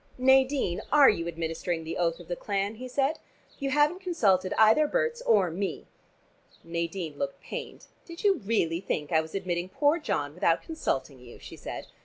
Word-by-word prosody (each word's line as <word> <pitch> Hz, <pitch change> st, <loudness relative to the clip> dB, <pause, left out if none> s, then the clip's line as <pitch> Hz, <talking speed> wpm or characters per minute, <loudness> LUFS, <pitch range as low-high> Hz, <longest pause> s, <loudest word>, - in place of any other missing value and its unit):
"Nadine, 265 Hz, -6 st, +3 dB
are 290 Hz, -2 st, +7 dB
you 170 Hz, -5 st, -4 dB
administering 165 Hz, 0 st, -3 dB
the 160 Hz, +1 st, -5 dB
oath 170 Hz, -1 st, 0 dB
of 175 Hz, -, -12 dB
the 175 Hz, -, -2 dB
clan?" 200 Hz, +2 st, -2 dB
he 255 Hz, +2 st, -7 dB
said. 275 Hz, +4 st, 0 dB, 0.4 s
"You 275 Hz, -1 st, -1 dB
haven't 295 Hz, +5 st, +2 dB
consulted 200 Hz, -, +2 dB
either 220 Hz, +8 st, +5 dB
Berts 475 Hz, +4 st, -1 dB
or 200 Hz, -, +3 dB
me." 190 Hz, +4 st, -3 dB, 0.8 s
Nadine 170 Hz, -2 st, -4 dB
looked 140 Hz, 0 st, -3 dB
pained. -, -, -7 dB, 0.2 s
"Did 335 Hz, 0 st, -9 dB
you 395 Hz, -5 st, +3 dB
really 195 Hz, -7 st, 0 dB
think 150 Hz, -6 st, -3 dB
I 160 Hz, -1 st, +4 dB
was 160 Hz, +3 st, -9 dB
admitting 180 Hz, -2 st, -2 dB
poor 295 Hz, -, +2 dB
John 145 Hz, -, -2 dB
without 165 Hz, 0 st, +1 dB
consulting 140 Hz, -, -3 dB
you?" 125 Hz, -1 st, -13 dB
she -, -, -11 dB
said. -, -, -7 dB
195 Hz, 175 wpm, -28 LUFS, 165-280 Hz, 0.8 s, are